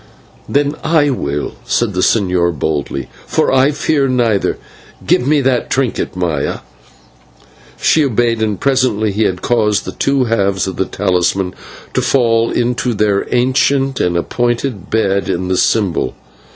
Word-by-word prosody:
"Then 145 0 +1
I 150 -3 +3
will," 75 - -3
said 120 -4 0
the 90 - -2
señor 90 -6 +1
boldly, 70 -2 -2 0.2
"for - - +1
I 135 +1 +4
fear 145 -1 0
neither. 120 -6 +1 0.5
Give 125 - +2
me 150 0 +3
that 130 -2 0
trinket, 130 -8 -1
Maya." 85 -6 -2 1.2
She 155 - +3
obeyed, 115 -2 0
and 105 -3 -1
presently 130 -6 +1
he 105 +2 0
had 90 -1 -2
caused 110 -4 +1
the - - -4
two 135 -1 +1
halves 100 -5 0
of 95 -2 -5
the 95 - 0
talisman 95 -1 0 0.4
to - - +1
fall 115 -3 +2
into 120 0 -1
their 100 -1 +1
ancient 135 +2 +1
and 85 -1 +1
appointed 120 +1 -2
bed 100 -3 0
in 90 +1 -2
the 95 - +1
symbol. 95 - +1
110 Hz, 145 wpm, -15 LUFS, 95-130 Hz, 1.2 s, I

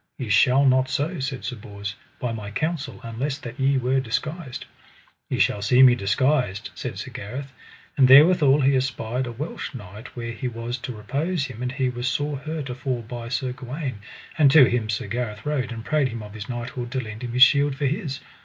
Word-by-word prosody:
Ye 125 -5 -5
shall 125 +7 +5
not 130 0 +4
so, 145 +7 -1
said 135 -1 -4
Sir 125 - -3
Bors, 100 -2 -7 0.3
by 125 - -2
my 105 -3 -5
counsel, 145 - -3
unless 125 +5 -3
that 125 -1 -9
ye 135 +1 +3
were 130 +1 +1
disguised. 130 +4 -4 0.6
Ye - - -1
shall 105 - +2
see 125 +5 +5
me 125 -2 +8
disguised, 120 0 0
said - - -6
Sir - - -6
Gareth; 130 +7 -6 0.4
and 135 -2 +6
therewithal 145 0 +7
he 135 +1 +4
espied 125 -1 -1
a - - -4
Welsh 140 +3 -6
knight 105 -1 -10
where 115 -1 -4
he 115 +2 -4
was 120 +1 -4
to 125 0 -6
repose 145 +9 -2
him, 125 -3 -8
and 125 0 -2
he 135 -1 0
was 120 0 -3
sore 145 +1 -1
hurt 155 0 -5
afore 130 -1 -3
by 115 +1 -7
Sir 125 +1 -1
Gawaine, 130 -1 -5 0.4
and 145 -3 +7
to 140 -1 +8
him 115 -3 -1
Sir 110 0 -1
Gareth 105 -1 -4
rode, 145 -4 -1
and 115 -1 -7
prayed 150 -3 +2
him 115 -3 -6
of 105 -1 -10
his 105 -2 -8
knighthood 120 0 -4
to 130 - 0
lend 110 -2 -7
him 120 -1 -4
his 125 +1 +8
shield 140 +1 +5
for 145 +1 -2
his. 140 -1 -2
130 Hz, 210 wpm, -24 LUFS, 115-140 Hz, 0.6 s, me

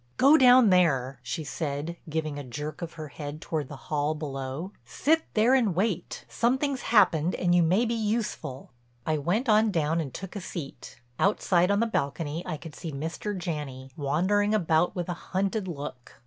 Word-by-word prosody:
"Go 280 +4 +7
down 250 -6 +7
there," 135 -8 +2
she 155 +6 -4
said, 150 +2 -4
giving 155 -2 -2
a - - -6
jerk 150 +6 -6
of 170 -1 -5
her 155 -2 -7
head 145 +1 -7
toward 155 -3 -3
the 145 - -8
hall 150 +2 -2
below. 140 +3 -5
"Sit 320 +3 +1
there 225 +4 +4
and 230 -9 +3
wait. 190 -2 -2
Something's 265 +3 0
happened 180 -7 +3
and 175 -1 +1
you 175 - +5
may 185 +8 +3
be 235 - -1
useful." 215 - -3 0.3
I 155 -1 0
went 190 - 0
on 215 0 +5
down 165 -2 +1
and 140 -4 -5
took 190 +6 -8
a 200 - -4
seat. 165 -6 -8 0.2
Outside 185 -2 +3
on 200 +1 +2
the - - +3
balcony 150 -5 -2
I 155 - -3
could 160 0 -10
see 165 0 -6
Mr. 165 +8 -4
Janney, 145 -6 -5
wandering 190 +9 +1
about 170 -3 +2
with 175 -2 -3
a 175 - -2
hunted 190 +3 -2
look. 140 -6 -7
170 Hz, 180 wpm, -27 LUFS, 150-205 Hz, 0.3 s, Go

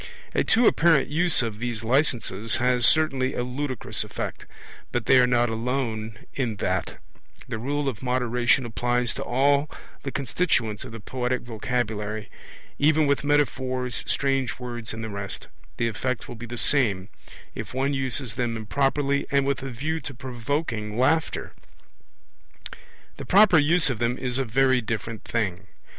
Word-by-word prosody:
A - - +2
too 235 +2 +3
apparent 165 -9 +4
use 165 -2 +2
of 110 -2 -4
these 120 -2 -3
licences 115 -5 +2
has 125 -1 +3
certainly 135 -5 +2
a 125 - -1
ludicrous 130 0 -3
effect, - - -6 0.4
but 120 -2 -1
they 130 - +6
are 125 - +5
not 120 -1 +3
alone 115 -2 -2 0.2
in 120 -5 -1
that; 100 - -2 0.5
the 110 -3 -4
rule 145 +4 -1
of 125 -6 -3
moderation 125 0 +1
applies 120 +1 0
to - - -4
all 140 +3 +2 0.3
the 135 - -4
constituents 130 - 0
of - - -9
the 115 - -8
poetic 125 +3 -2
vocabulary; 110 -3 -3 0.5
even 155 +1 +4
with 140 -1 +1
metaphors, 130 -3 0
strange 135 -2 0
words, 120 -2 -5
and 115 0 -6
the 110 - -4
rest, 100 -1 -4 0.3
the 115 - +1
effect 120 +2 -3
will - - -7
be 120 +1 -8
the 120 +1 -6
same, 105 -10 +3 0.5
if - - -6
one 135 +2 0
uses 130 -3 -1
them 120 -1 -2
improperly 140 +5 0
and 140 -1 +2
with 140 -1 0
a 135 - -5
view 150 +7 -2
to 135 -2 -8
provoking 120 -3 -3
laughter. 150 +6 +1 1.6
The - - -7
proper 195 -3 +6
use 155 0 +3
of 115 - -4
them 120 +1 0
is 125 0 -2
a 135 - 0
very 130 +2 +3
different 110 -1 -4
thing. 95 -5 -2
125 Hz, 155 wpm, -25 LUFS, 115-140 Hz, 1.6 s, they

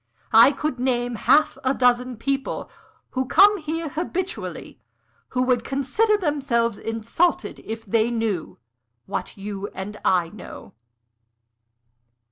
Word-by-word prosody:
I 230 +5 +8
could 290 -2 -3
name 245 -1 0
half 275 +7 +3
a 260 +1 +1
dozen 250 -1 +2
people, 270 +3 -3 0.4
who 260 0 -2
come 410 +6 +6
here 325 +1 -3
habitually, 355 +5 -5 0.5
who 250 0 0
would 250 -2 +1
consider 280 - +1
themselves 265 - 0
insulted 225 +10 -1
if 225 0 -7
they 220 +3 +2
knew 225 -7 -2 0.5
what - - -5
you 200 0 -5
and 205 +2 -6
I 175 -3 +2
know." 210 +1 -11
250 Hz, 115 wpm, -23 LUFS, 225-290 Hz, 0.5 s, I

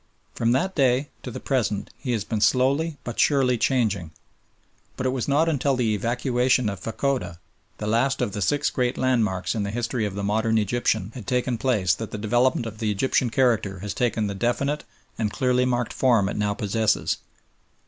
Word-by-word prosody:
From 115 0 +1
that 185 +9 0
day 135 -1 +2
to - - -6
the 120 - -6
present 115 -7 -1
he 130 - -4
has 110 -4 -1
been 110 0 -3
slowly, 140 +7 +2
but 120 - -6
surely, 135 -4 +3
changing; 110 - 0 0.9
but 130 - -3
it 130 - +2
was 130 -2 -2
not 145 +4 +3
until 140 -3 +1
the 115 -4 +1
evacuation 125 +2 +1
of 100 - -5
Fachoda, 115 -7 -2 0.4
the 105 - -5
last 120 +6 +1
of 120 -5 0
the 105 - -4
six 145 +8 +1
great 125 -2 0
landmarks 110 -8 +1
in 110 - -2
the 100 - -2
history 120 0 -1
of 100 - -7
the 100 - -3
modern 110 +2 +1
Egyptian, 110 -1 0
had 120 -6 -9
taken 125 -1 0
place 105 -8 +2
that 110 +2 -5
the - - -5
development 120 +3 +1
of 110 -1 -7
the 110 - 0
Egyptian 120 +4 +1
character 115 -6 +1
has 100 -1 -4
taken 115 -3 0
the 100 - -2
definite 130 +8 -1 0.3
and 110 -2 +1
clearly 125 -1 +1
marked 120 -2 -1
form 115 -7 +3
it - - -3
now 105 -1 0
possesses. 110 +1 0
120 Hz, 190 wpm, -24 LUFS, 105-130 Hz, 0.9 s, surely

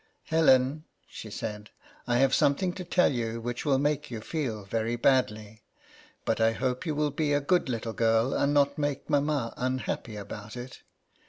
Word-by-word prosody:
" - - -46
Helen," 150 -1 +4 0.2
she - - -9
said, 105 0 -6 0.2
" - - -24 0.2
I 120 -1 +2
have 135 +1 +3
something 175 +6 +2
to 185 - -6
tell 180 +1 +3
you 115 -1 -2
which 120 +3 -4
will 140 -3 +3
make 150 +1 0
you 115 -3 -5
feel 115 -4 -3
very 115 +3 -1
badly; 110 -4 +1 0.6
but - - 0
I 115 0 +4
hope 130 +6 -2
you 155 - -1
will 150 0 +1
be 145 0 0
a 145 - +3
good 160 +1 +1
little 115 -2 -3
girl, 115 +2 +2
and 140 - +1
not 140 0 +2
make 145 +1 -2
mamma 145 -4 +1
unhappy 130 -3 -2
about 105 +2 -8
it. 125 +1 -8
130 Hz, 185 wpm, -28 LUFS, 115-145 Hz, 0.6 s, Helen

